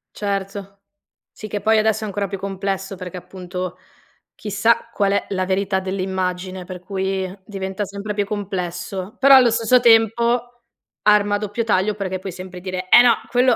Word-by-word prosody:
Certo. 195 Hz, -1 st, -4 dB, 0.5 s
Sì, 215 Hz, -, -9 dB
che 205 Hz, 0 st, -4 dB
poi 220 Hz, +2 st, +3 dB
adesso 220 Hz, 0 st, +2 dB
è -, -, -3 dB
ancora 200 Hz, 0 st, -2 dB
più 195 Hz, 0 st, -5 dB
complesso 195 Hz, 0 st, -3 dB
perché 185 Hz, -1 st, -7 dB
appunto 180 Hz, 0 st, -6 dB, 0.6 s
chissà 220 Hz, +3 st, +1 dB
qual 200 Hz, -3 st, +1 dB
è 200 Hz, -, 0 dB
la 185 Hz, -1 st, -1 dB
verità 190 Hz, +1 st, 0 dB
dell'immagine 185 Hz, -1 st, -3 dB
per 180 Hz, 0 st, -8 dB
cui 190 Hz, 0 st, -3 dB
diventa 195 Hz, 0 st, -4 dB
sempre 200 Hz, +2 st, -5 dB
più 205 Hz, -1 st, 0 dB
complesso, 190 Hz, -1 st, -4 dB
però 275 Hz, +1 st, +8 dB
allo 250 Hz, -3 st, +6 dB
stesso 230 Hz, +2 st, +4 dB
tempo, 235 Hz, +1 st, +3 dB, 0.4 s
arma 210 Hz, -1 st, +4 dB
a -, -, +2 dB
doppio 210 Hz, +2 st, -3 dB
taglio 210 Hz, -1 st, +1 dB
perché 190 Hz, -2 st, -3 dB
puoi 190 Hz, +1 st, -6 dB
sempre 180 Hz, 0 st, -9 dB
dire: 185 Hz, 0 st, -4 dB
"Eh 240 Hz, -, +9 dB
no, 245 Hz, -, +6 dB, 0.2 s
quello 250 Hz, 0 st, +3 dB
195 Hz, 170 wpm, -21 LUFS, 185-215 Hz, 0.6 s, Eh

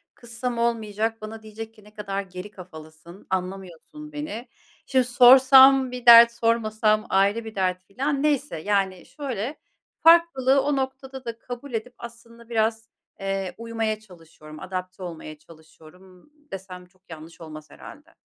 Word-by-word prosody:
kızsam 240 Hz, 0 st, -6 dB
olmayacak, 225 Hz, -1 st, -2 dB
bana 220 Hz, +1 st, -8 dB
diyecek 220 Hz, +1 st, -10 dB
ki, 215 Hz, -2 st, -20 dB
'Ne 210 Hz, 0 st, -19 dB
kadar 200 Hz, -2 st, -4 dB
geri 185 Hz, +1 st, -10 dB
kafalısın, 170 Hz, 0 st, -14 dB
anlamıyorsun 190 Hz, -, -6 dB
beni.' 295 Hz, -5 st, -6 dB, 0.4 s
Şimdi 260 Hz, -1 st, +2 dB
sorsam 265 Hz, +1 st, +7 dB
bir 250 Hz, -1 st, -8 dB
dert, 235 Hz, 0 st, +9 dB
sormasam 220 Hz, -2 st, 0 dB
ayrı 200 Hz, +4 st, +1 dB
bir 220 Hz, -, -9 dB
dert." 185 Hz, -1 st, -1 dB
filan. 275 Hz, +8 st, -3 dB
Neyse, 290 Hz, -, 0 dB
yani, 195 Hz, -2 st, -1 dB
şöyle, 265 Hz, -2 st, -5 dB, 0.5 s
farklılığı 280 Hz, -6 st, +5 dB
o 290 Hz, 0 st, 0 dB
noktada 265 Hz, 0 st, -5 dB
da 230 Hz, -1 st, -6 dB
kabul 245 Hz, +2 st, -9 dB
edip 230 Hz, +3 st, -4 dB
aslında 235 Hz, 0 st, -13 dB
biraz, 225 Hz, 0 st, -1 dB, 0.3 s
eee, 195 Hz, -2 st, -3 dB
uymaya 225 Hz, -2 st, -3 dB
çalışıyorum, 165 Hz, -6 st, -15 dB
adapte 185 Hz, 0 st, -7 dB
olmaya 160 Hz, -3 st, -8 dB
çalışıyorum, 160 Hz, +2 st, -19 dB
ımm, 185 Hz, +10 st, -21 dB, 0.2 s
desem 185 Hz, -1 st, -9 dB
çok 185 Hz, 0 st, -33 dB
yanlış 160 Hz, +1 st, -12 dB
olmaz 155 Hz, -1 st, -11 dB
herhâlde. 305 Hz, +3 st, -14 dB
220 Hz, 140 wpm, -24 LUFS, 185-250 Hz, 0.5 s, dert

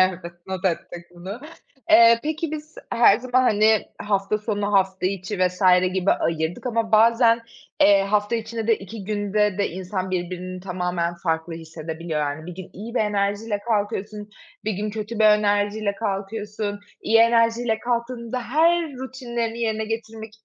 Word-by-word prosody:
Evet, 185 Hz, -1 st, +3 dB, 0.3 s
not 190 Hz, 0 st, -5 dB
ettik 175 Hz, -1 st, -2 dB
bunu. 190 Hz, +7 st, -7 dB, 0.5 s
Eee, 230 Hz, +1 st, +7 dB
peki 315 Hz, +1 st, -2 dB
biz 310 Hz, 0 st, -7 dB, 0.2 s
her 230 Hz, -3 st, +6 dB
zaman, 255 Hz, +1 st, +1 dB
hani, 215 Hz, -2 st, +3 dB, 0.2 s
hafta 200 Hz, 0 st, 0 dB
sonu, 205 Hz, -1 st, -2 dB
hafta 190 Hz, -1 st, +2 dB
içi 195 Hz, +1 st, -3 dB
vs. 180 Hz, +1 st, 0 dB, 0.3 s
gibi 190 Hz, 0 st, +1 dB
ayırdık 165 Hz, +6 st, -2 dB
ama 230 Hz, -2 st, -1 dB
bazen, 230 Hz, +1 st, +5 dB, 0.4 s
eee, 200 Hz, -1 st, +6 dB
hafta 205 Hz, +3 st, +1 dB
içine 225 Hz, 0 st, -4 dB
de 225 Hz, -1 st, +4 dB
2 195 Hz, +1 st, -9 dB
günde 210 Hz, -1 st, 0 dB
de 200 Hz, -, 0 dB
insan 185 Hz, +1 st, -4 dB
birbirinin 185 Hz, 0 st, -4 dB
tamamen 180 Hz, -2 st, -2 dB
farklı 160 Hz, -1 st, -1 dB
hissedebiliyor, 160 Hz, 0 st, -5 dB
yani. 150 Hz, +2 st, -3 dB
Bir 180 Hz, -, -7 dB
gün 185 Hz, -1 st, -9 dB
iyi 225 Hz, +5 st, -8 dB
bir -, -, +2 dB
enerjiyle 205 Hz, +1 st, 0 dB
kalkıyorsun, 210 Hz, -1 st, -2 dB, 0.3 s
bir 215 Hz, -, 0 dB
gün 210 Hz, +2 st, -3 dB
kötü 215 Hz, +1 st, -5 dB
bir 220 Hz, -, +4 dB
enerjiyle 205 Hz, 0 st, +2 dB
kalkıyorsun. 205 Hz, 0 st, -4 dB, 0.2 s
İyi 225 Hz, +1 st, +4 dB
enerjiyle 230 Hz, 0 st, +3 dB
kalktığında 240 Hz, 0 st, -3 dB
her 330 Hz, +7 st, +3 dB
rutinlerini 240 Hz, -3 st, -4 dB
yerine 220 Hz, -1 st, -1 dB
getirmek 225 Hz, 0 st, -6 dB
210 Hz, 150 wpm, -23 LUFS, 190-230 Hz, 0.5 s, Eee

